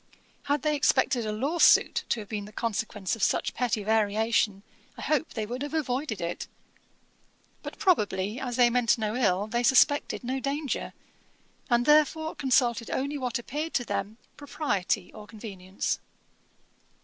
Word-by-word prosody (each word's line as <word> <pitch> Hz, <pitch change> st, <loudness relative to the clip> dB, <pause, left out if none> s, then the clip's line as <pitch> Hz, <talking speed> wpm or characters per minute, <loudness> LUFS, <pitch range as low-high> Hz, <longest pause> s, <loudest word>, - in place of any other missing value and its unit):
Had 285 Hz, 0 st, 0 dB
they 305 Hz, -1 st, +2 dB
expected 260 Hz, -5 st, +2 dB
a -, -, -1 dB
lawsuit 280 Hz, +10 st, +3 dB
to 230 Hz, -, 0 dB
have 205 Hz, -, -10 dB
been 210 Hz, -2 st, -4 dB
the 210 Hz, -, -12 dB
consequence 215 Hz, -3 st, -2 dB
of 225 Hz, -, -10 dB
such -, -, +1 dB
petty 230 Hz, -4 st, -1 dB
variation, 215 Hz, -1 st, +1 dB, 0.3 s
I -, -, -7 dB
hope 310 Hz, +1 st, 0 dB
they 220 Hz, -2 st, -2 dB
would 245 Hz, +4 st, -5 dB
have 290 Hz, +2 st, -4 dB
avoided 260 Hz, -5 st, -2 dB
it. 170 Hz, +1 st, -4 dB, 1.1 s
But, -, -, -8 dB
probably, 210 Hz, -, +1 dB
as 250 Hz, -2 st, -4 dB
they 240 Hz, -1 st, +5 dB
meant 245 Hz, -2 st, +3 dB
no 215 Hz, 0 st, -2 dB
ill, 205 Hz, -5 st, +1 dB
they 235 Hz, +3 st, -1 dB
suspected 265 Hz, +3 st, +3 dB
no 260 Hz, +2 st, -2 dB
danger, 280 Hz, +1 st, -3 dB, 0.8 s
and, 240 Hz, 0 st, +3 dB
therefore, 310 Hz, +2 st, +3 dB
consulted 245 Hz, -3 st, +1 dB
only 280 Hz, +2 st, -2 dB
what 250 Hz, -1 st, -1 dB
appeared 300 Hz, +7 st, -5 dB
to 245 Hz, -, +1 dB
them 205 Hz, +1 st, -3 dB, 0.2 s
propriety 245 Hz, -, -2 dB
or 210 Hz, -1 st, -11 dB
convenience.' 195 Hz, -4 st, -4 dB
240 Hz, 150 wpm, -27 LUFS, 210-280 Hz, 1.1 s, they